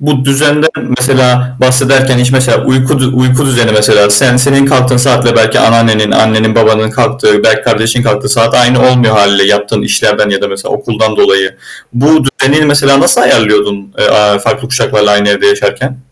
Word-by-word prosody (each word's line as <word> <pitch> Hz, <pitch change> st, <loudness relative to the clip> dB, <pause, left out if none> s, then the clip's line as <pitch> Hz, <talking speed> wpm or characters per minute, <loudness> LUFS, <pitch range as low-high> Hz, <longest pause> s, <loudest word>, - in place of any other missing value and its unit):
Bu 140 Hz, -2 st, -2 dB
düzenden 150 Hz, +3 st, +1 dB, 0.3 s
mesela 125 Hz, -1 st, 0 dB
bahsederken 130 Hz, 0 st, +1 dB
hiç 125 Hz, +1 st, 0 dB
mesela 130 Hz, -3 st, 0 dB
uyku, 130 Hz, +2 st, 0 dB, 0.2 s
uyku 130 Hz, +2 st, 0 dB
düzeni 120 Hz, -4 st, 0 dB
mesela 105 Hz, -1 st, +2 dB
sen 125 Hz, +4 st, +3 dB
senin 135 Hz, +2 st, +1 dB
kalktığın 130 Hz, -2 st, 0 dB
saatle 125 Hz, -2 st, +1 dB
belki 110 Hz, -1 st, +1 dB
anneannenin, 110 Hz, -2 st, +1 dB
annenin, 110 Hz, 0 st, 0 dB
babanın 110 Hz, -1 st, +1 dB
kalktığı 110 Hz, -4 st, -1 dB
belki 110 Hz, -1 st, +1 dB
kardeşin 115 Hz, +3 st, -1 dB
kalktığı 105 Hz, +6 st, -2 dB
saat 115 Hz, -4 st, 0 dB
aynı 125 Hz, +1 st, +2 dB
olmuyor 120 Hz, -3 st, +1 dB
hâliyle 100 Hz, -1 st, +2 dB
yaptığın 105 Hz, 0 st, -1 dB
işlerden 105 Hz, -, -1 dB
ya 100 Hz, 0 st, -3 dB
da 100 Hz, -, -2 dB
mesela 95 Hz, 0 st, -6 dB
okuldan 110 Hz, -4 st, -3 dB
dolayı, 95 Hz, -1 st, 0 dB, 0.4 s
bu 125 Hz, +4 st, -2 dB, 0.2 s
düzeni 135 Hz, +3 st, -1 dB
mesela 140 Hz, -1 st, +2 dB
nasıl -, -, +2 dB
ayarlıyordun, 105 Hz, -2 st, -1 dB
eee, -, -, +1 dB
aaa, 105 Hz, -1 st, +1 dB
farklı 135 Hz, +4 st, -4 dB
kuşaklarla 105 Hz, -5 st, -1 dB
aynı 105 Hz, 0 st, 0 dB
evde 100 Hz, -, 0 dB
yaşarken? 135 Hz, -10 st, -3 dB
125 Hz, 170 wpm, -8 LUFS, 105-135 Hz, 0.4 s, sen